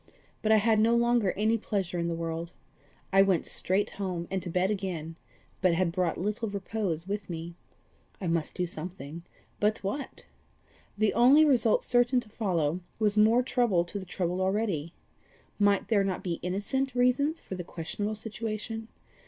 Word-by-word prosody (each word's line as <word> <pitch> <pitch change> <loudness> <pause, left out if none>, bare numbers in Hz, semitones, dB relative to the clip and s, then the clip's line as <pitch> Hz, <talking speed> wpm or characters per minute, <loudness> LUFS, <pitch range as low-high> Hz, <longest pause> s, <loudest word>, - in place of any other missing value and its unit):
But 220 - +1
I - - +8
had 215 +1 +3
no 230 +2 +4
longer 235 -4 +3
any 220 +3 +1
pleasure 190 -5 -2
in 170 - 0
the 170 - -1
world. 165 +1 -4 0.6
I 195 - +7
went 190 -4 +3
straight 200 +3 0
home, 180 -4 -4
and 190 -1 -1
to 175 - -6
bed 185 +3 +1
again 175 -5 -4 0.5
but 180 -2 +4
had 175 -1 +1
brought 180 -1 0
little 210 +4 -2
repose 195 -4 -3
with 200 -1 -4
me: 170 0 -5 0.7
I 190 - -5
must 165 -2 -1
do 180 - 0
something 170 -2 -6 0.4
but 210 +1 +1
what? 265 +9 -4 0.7
The 215 0 +2
only 265 +7 +6
result 240 -6 +3
certain 245 +1 +3
to 225 - -14
follow, 180 -7 0 0.2
was 210 -2 +2
more 220 +4 +5
trouble 235 -9 +2
to 200 +4 -4
the 190 - -8
troubled 180 0 -2
already. 190 -5 -1 0.6
Might 200 -1 +3
there 205 -3 +4
not 190 -2 -2
be 170 -3 -2
innocent 245 +9 -2
reasons 255 +6 +2
for - - -8
the 180 -1 -4
questionable 205 +6 -4
situation? 225 +1 -5
200 Hz, 170 wpm, -29 LUFS, 175-220 Hz, 0.7 s, I